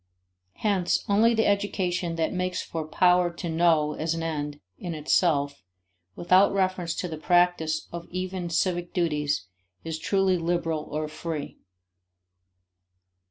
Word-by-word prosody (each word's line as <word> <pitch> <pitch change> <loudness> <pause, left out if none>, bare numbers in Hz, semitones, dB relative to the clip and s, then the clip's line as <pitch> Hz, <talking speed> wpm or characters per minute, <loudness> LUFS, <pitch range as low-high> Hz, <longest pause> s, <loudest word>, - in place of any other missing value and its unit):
Hence 195 -5 0
only 225 +3 +4
the 225 - +2
education 185 -4 0
that 165 -1 -1
makes 180 0 -1
for 160 -2 -5
power 180 +2 +3
to 170 +1 -6
know 160 -2 +2
as 160 +2 -2
an 165 - -3
end 150 -2 -3 0.2
in 175 -3 -4
itself, 145 - +1 0.5
without 185 +3 +4
reference 185 -3 0
to 180 - -3
the 160 -2 -6
practice 175 -2 +2
of 170 0 -6
even 185 -1 -4
civic 175 +1 -1
duties, 150 - 0 0.4
is 160 -1 -4
truly 190 0 +2
liberal 165 -2 -1
or 155 +1 -2
free. 155 -1 -6
170 Hz, 130 wpm, -26 LUFS, 160-185 Hz, 0.5 s, only